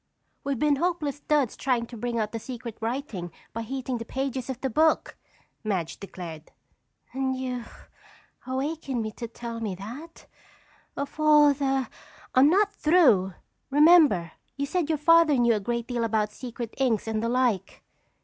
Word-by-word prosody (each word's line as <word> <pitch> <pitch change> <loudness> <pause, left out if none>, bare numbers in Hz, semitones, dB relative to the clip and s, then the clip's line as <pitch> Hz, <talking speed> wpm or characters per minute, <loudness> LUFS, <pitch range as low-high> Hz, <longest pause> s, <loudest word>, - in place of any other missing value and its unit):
"We've 280 -2 -1
been 295 +2 +2
hopeless 305 -3 -1
duds 290 -6 +1
trying 250 -3 0
to 235 - -11
bring 235 +1 -3
out 215 -1 -1
the 230 - -4
secret 240 -1 -7
writing 225 -7 -4 0.2
by 230 - -3
heating 255 +1 -4
the - - -4
pages 265 +1 -3
of 255 -2 -4
the 265 - -1
book!" 315 +6 +2 0.5
Madge 190 -7 -2
declared. 170 -5 -8 0.6
"And 265 0 -1
you 250 -2 -4 0.8
awakened 265 -1 -2
me 215 - -4
to 235 +2 -7
tell 230 0 -7
me 210 -5 -3
that? 245 - -10 0.7
Of 280 +2 -5
all 300 -1 +6
the—" 270 -2 0 0.5
"I'm 265 +3 +6
not 410 +4 +3
through. 250 - +4 0.3
Remember, 290 - +5 0.3
you 280 - -1
said 330 +1 -1
your 315 - +1
Father 330 0 +5
knew 235 -1 +4
a 215 - 0
great 235 +3 -2
deal 240 -1 -2
about 215 -2 0
secret 235 -1 -7
inks 240 -5 +1
and 220 -1 -1
the 230 - -1
like." 245 -6 0
255 Hz, 160 wpm, -26 LUFS, 225-285 Hz, 0.8 s, all